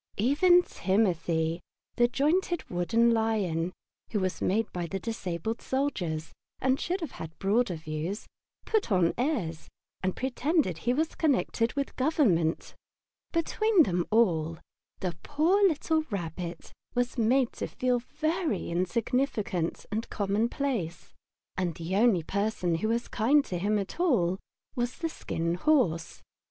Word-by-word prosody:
Even 350 - +5
Timothy, 170 - 0 0.3
the 240 - +4
jointed 335 +7 +1
wooden 225 +7 +3
lion, 205 -7 0 0.4
who 210 - +1
was 185 -1 -2
made 220 +4 +2
by 175 -1 -3
the 195 - -3
disabled 220 0 -3
soldiers, 180 - -2 0.3
and 260 +1 +2
should 365 +2 -2
have 315 -7 -4
had 160 0 -8
broader 200 -1 +1
views, 155 +5 -4 0.4
put 435 - 0
on 180 -3 +3
airs 225 - -2 0.3
and 185 0 -1
pretended 265 - 0
he 240 +8 +1
was 315 +3 0
connected 245 -6 +1
with 280 -1 -3
Government. 235 - +2 0.6
Between 375 +3 +3
them 175 -7 0
all 165 -8 +2 0.4
the 180 -3 -2
poor 325 +8 +2
little 320 -1 +1
Rabbit 175 -3 -5 0.2
was 245 +1 0
made 245 +3 +3
to - - -4
feel 250 -1 0
himself 245 - -22
very 315 - 0
insignificant 200 - -1
and 220 +2 -2
commonplace, 210 - -1 0.4
and 180 -3 -1
the 170 +3 -3
only 210 -5 +4
person 200 -1 -1
who 165 +7 0
was 235 +2 0
kind 275 +6 +3
to 180 - -3
him 210 +3 +1
at 200 - -4
all 195 - +2 0.4
was 245 0 -1
the 330 - -2
Skin 170 - -2
Horse. 180 - +1
220 Hz, 135 wpm, -29 LUFS, 175-275 Hz, 0.6 s, Even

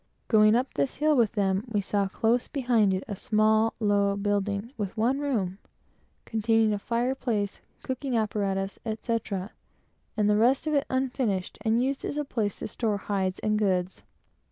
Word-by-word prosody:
Going 215 -1 +6
up 255 +2 0
this 140 -1 -1
hill 305 +1 +2
with 235 -4 +3
them, 195 -2 +1
we 220 -3 0
saw, 200 0 0
just 235 +2 +2
behind 240 -7 +2
it, 185 0 -1
a 205 - -4
small, 215 +2 +2
low 200 -2 +2
building, 205 +3 -1
with 205 0 -4
one 245 +5 +2
room, 210 -10 -1 0.7
containing 225 -1 +2
a 205 - -2
fire 240 +4 0
place, 215 -7 -2 0.2
cooking 260 -1 -2
apparatus, 200 -3 -1
etc., 220 -3 -3 0.7
and 210 -1 +2
the 210 0 +3
rest 250 +7 +3
of 310 - 0
it 285 -1 +1
unfinished, 250 -7 -1
and 225 +2 +2
used 270 +1 -2
as 290 - -3
a 295 - -1
place 215 -7 -2
to - - -5
store 220 -4 -1
hides 190 -2 -2
and 215 0 +1
goods. 185 -3 0
215 Hz, 170 wpm, -27 LUFS, 200-240 Hz, 0.7 s, Going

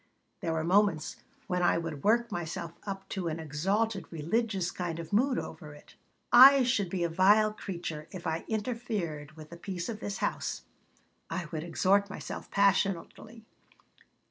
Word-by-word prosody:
There 165 - -2
were 160 -1 -1
moments 180 -2 +2 0.3
when 180 -1 -1
I 175 - +3
would 165 -4 -5
work 235 +2 +3
myself 170 -2 -4
up 195 -1 -5
to 190 -4 -3
an 160 0 -3
exalted, 195 +8 -1
religious 185 +3 -1
kind 175 -3 -4
of 170 +3 -7
mood 255 +5 +3
over 150 -4 -7
it. 150 - -17 0.4
"I 270 +2 +10
should 215 -6 +1
be 180 -1 -1
a - - +2
vile 205 +5 +4
creature 170 -6 -6
if 180 -2 -9
I 160 +1 -1
interfered 210 - -3
with 155 0 -12
the 170 - -9
peace 175 0 -5
of 220 -2 -5
this 205 -2 -4
house," - - -2 0.7
I 180 -2 -3
would 155 - -3
exhort 190 +4 +2
myself, 200 - -7
passionately. 200 +3 0
185 Hz, 160 wpm, -30 LUFS, 165-210 Hz, 0.7 s, I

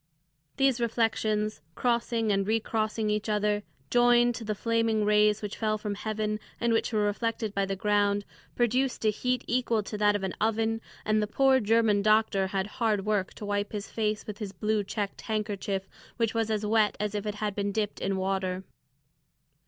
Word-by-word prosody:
These 270 -3 +3
reflections, 220 -2 0
crossing 235 -2 +1
and 195 -1 +1
recrossing 220 -1 0
each 210 +1 -1
other, 210 0 +1 0.3
joined 240 0 +5
to 230 - -6
the 215 -1 -2
flaming 230 -1 +1
rays 210 0 +3
which 210 - -4
fell 215 -1 0
from 210 -1 -3
heaven 215 0 -2 0.2
and 235 -1 +2
which 225 - +1
were 215 -2 +1
reflected 220 0 -1
by 200 -1 0
the 195 - -2
ground, 205 0 +1 0.3
produced 245 0 +1
a 215 - +5
heat 250 +4 -1
equal 235 -3 +1
to 210 +1 -6
that 205 0 +4
of 205 - -2
an 190 - -2
oven, 225 +1 +1 0.2
and 215 0 +2
the 210 - 0
poor 265 +4 +4
German 220 -2 +3
doctor 215 -2 +3
had 190 0 -1 0.2
hard 210 -4 +2
work 205 -3 0
to 210 - -7
wipe 205 0 -2
his 205 -1 -5
face 215 -1 -1
with 210 0 -7
his 205 -3 -5
blue 210 +2 0
checked 200 0 -4
handkerchief, 205 -3 -2 0.3
which 230 -2 +1
was 225 -1 0
as 215 -1 -1
wet 215 -1 +2
as 210 0 -1
if 210 0 -3
it 210 - -2
had 210 -1 -2
been 200 0 -1
dipped 210 0 -2
in 195 0 0
water. 190 -1 -1
215 Hz, 185 wpm, -28 LUFS, 205-225 Hz, 0.3 s, joined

